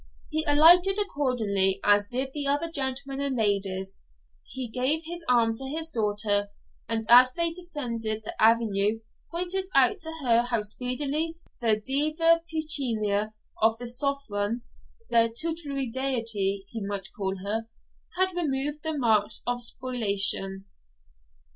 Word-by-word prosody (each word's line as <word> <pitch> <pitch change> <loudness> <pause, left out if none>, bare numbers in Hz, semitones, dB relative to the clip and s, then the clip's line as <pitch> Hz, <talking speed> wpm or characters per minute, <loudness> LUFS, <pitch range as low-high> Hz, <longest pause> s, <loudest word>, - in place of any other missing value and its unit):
He 315 0 +2
alighted 350 +6 +6
accordingly, 225 - 0
as 205 0 +3
did 260 +4 -3
the 290 -2 -3
other 290 +4 0
gentlemen 275 -1 -3
and 275 -2 -2
ladies; 195 -3 -1 0.5
he 260 -2 -6
gave 255 +7 0
his 345 +1 -5
arm 230 -2 +3
to 270 - -3
his 320 +4 -4
daughter, 205 -4 0 0.4
and 225 -1 -2
as 250 +2 +8
they 335 -1 +1
descended 235 -11 -3
the - - -6
avenue 220 -1 +2 0.3
pointed 365 +2 -2
out 260 -3 +3
to 320 0 -4
her 235 -2 +4
how 235 -3 0
speedily 280 +9 -2 0.2
the 220 -3 +2
'Diva 310 +7 +2
Pecunia 225 -10 +1 0.3
of 220 +1 +3
the 245 +1 -7
Southron 240 -4 -1 0.5
their 230 0 +4
tutelary 285 +1 -3
deity, 225 -6 -1
he 225 -3 -6
might 200 -1 -6
call 195 -2 -3
her 220 +3 -3 0.5
had 375 0 +1
removed 295 -2 -2
the 315 0 -3
marks 220 -5 +1
of 245 0 -2
spoliation.' 200 -6 +1
245 Hz, 135 wpm, -26 LUFS, 215-295 Hz, 0.5 s, as